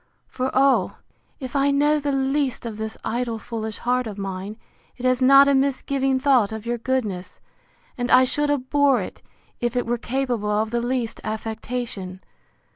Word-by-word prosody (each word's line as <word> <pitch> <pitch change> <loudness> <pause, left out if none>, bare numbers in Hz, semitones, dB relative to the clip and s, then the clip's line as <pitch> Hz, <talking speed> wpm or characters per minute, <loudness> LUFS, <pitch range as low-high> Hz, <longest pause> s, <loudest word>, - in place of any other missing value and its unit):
For, 255 0 -2
oh! 260 -7 +3 0.4
if 260 -1 -7
I 280 0 +3
know 295 +2 +3
the 290 0 -1
least 270 -1 0
of 225 -2 -5
this 220 0 -5
idle 235 0 -2
foolish 220 -1 -5
heart 250 0 0
of 210 -2 -7
mine, 195 +1 -5 0.4
it 255 - -6
has 255 0 +2
not 275 +2 +7
a 280 - +4
misgiving 270 0 +1
thought 260 -7 +3
of 220 0 -6
your 240 0 -2
goodness; 215 -8 -3 0.6
and 245 0 -1
I 255 +1 +7
should 295 +3 0
abhor 280 -1 +2
it, 185 - -7 0.4
if 240 0 -1
it 245 - 0
were 240 0 -1
capable 245 -4 -2
of 215 +1 0
the 235 0 0
least 240 -2 -2
affectation. 220 -3 -5
245 Hz, 170 wpm, -23 LUFS, 220-270 Hz, 0.6 s, not